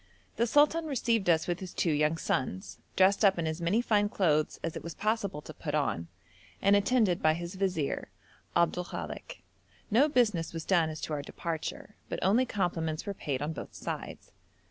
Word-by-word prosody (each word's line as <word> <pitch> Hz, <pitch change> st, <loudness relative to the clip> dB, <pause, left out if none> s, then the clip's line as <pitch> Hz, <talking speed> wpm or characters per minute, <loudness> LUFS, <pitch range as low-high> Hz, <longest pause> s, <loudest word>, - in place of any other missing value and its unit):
The 235 Hz, +2 st, +2 dB
sultan 300 Hz, +5 st, +4 dB
received 230 Hz, -8 st, +1 dB
us 160 Hz, -2 st, +4 dB
with 175 Hz, 0 st, -2 dB
his 185 Hz, -2 st, -8 dB
two 170 Hz, -, +1 dB
young 150 Hz, +2 st, +2 dB
sons, 95 Hz, -, -2 dB, 0.2 s
dressed 195 Hz, +3 st, +4 dB
up 195 Hz, -2 st, +5 dB
in 170 Hz, -, -1 dB
as 160 Hz, +2 st, -3 dB
many 200 Hz, +8 st, +2 dB
fine 205 Hz, -3 st, +2 dB
clothes 155 Hz, -7 st, +1 dB
as 165 Hz, -, -3 dB
it -, -, -6 dB
was 170 Hz, 0 st, -6 dB
possible 210 Hz, -8 st, -1 dB
to 155 Hz, -, -9 dB
put 150 Hz, -1 st, -4 dB
on, 85 Hz, -, 0 dB, 0.5 s
and 200 Hz, -, +4 dB
attended 205 Hz, -3 st, +2 dB
by 155 Hz, 0 st, +4 dB
his 170 Hz, +2 st, -5 dB
vizier, 185 Hz, -7 st, -1 dB, 0.5 s
Abdul 175 Hz, +1 st, +2 dB
Kalek; -, -, -7 dB, 0.5 s
no 265 Hz, +8 st, +5 dB
business 215 Hz, -, +1 dB
was 165 Hz, -1 st, -5 dB
done 170 Hz, -4 st, +3 dB
as 155 Hz, -1 st, -6 dB
to 155 Hz, -, -3 dB
our 145 Hz, -, -1 dB
departure, 165 Hz, +6 st, -5 dB
but -, -, -2 dB
only 230 Hz, +7 st, +3 dB
compliments 165 Hz, -6 st, -1 dB
were 200 Hz, -, -3 dB
paid 145 Hz, -7 st, -3 dB
on 155 Hz, +2 st, -2 dB
both -, -, -8 dB
sides. -, -, -6 dB
175 Hz, 190 wpm, -30 LUFS, 155-205 Hz, 0.5 s, up